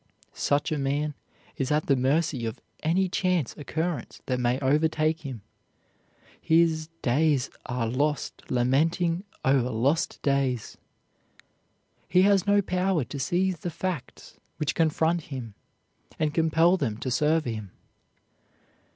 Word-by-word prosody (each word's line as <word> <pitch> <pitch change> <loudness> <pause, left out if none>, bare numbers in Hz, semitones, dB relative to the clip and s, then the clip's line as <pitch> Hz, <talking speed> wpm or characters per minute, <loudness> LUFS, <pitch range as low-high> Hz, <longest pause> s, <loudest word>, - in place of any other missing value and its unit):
Such 145 +2 0
a 155 - 0
man 145 +2 -1 0.4
is 135 +1 -1
at 150 +1 +2
the 140 - +3
mercy 135 -1 +1
of 110 - -6 0.2
any 180 +4 +2
chance 180 -6 0
occurrence 160 +3 -3
that 125 -1 -1
may 125 +1 +1
overtake 155 +3 +2
him. 130 -8 -7 1.0
His 160 -1 +2
"days 140 +1 +2 0.2
are 120 -2 -1
lost 145 +5 -2
lamenting 165 +9 +1 0.2
o'er 135 0 +4
lost 130 +8 0
days." 135 -5 0 1.3
He 185 0 +5
has 200 -1 +3
no 205 0 +4
power 185 -3 +1
to 140 +4 -7
seize 180 +6 0
the 175 - -3
facts 170 -3 -5 0.2
which 150 - -1
confront 160 +1 +1
him 125 -6 -7 0.6
and 155 -1 0
compel 165 +3 +3
them 115 - -2
to 130 +2 -4
serve 155 +4 +2
him. 110 -4 -4
150 Hz, 125 wpm, -27 LUFS, 130-165 Hz, 1.3 s, He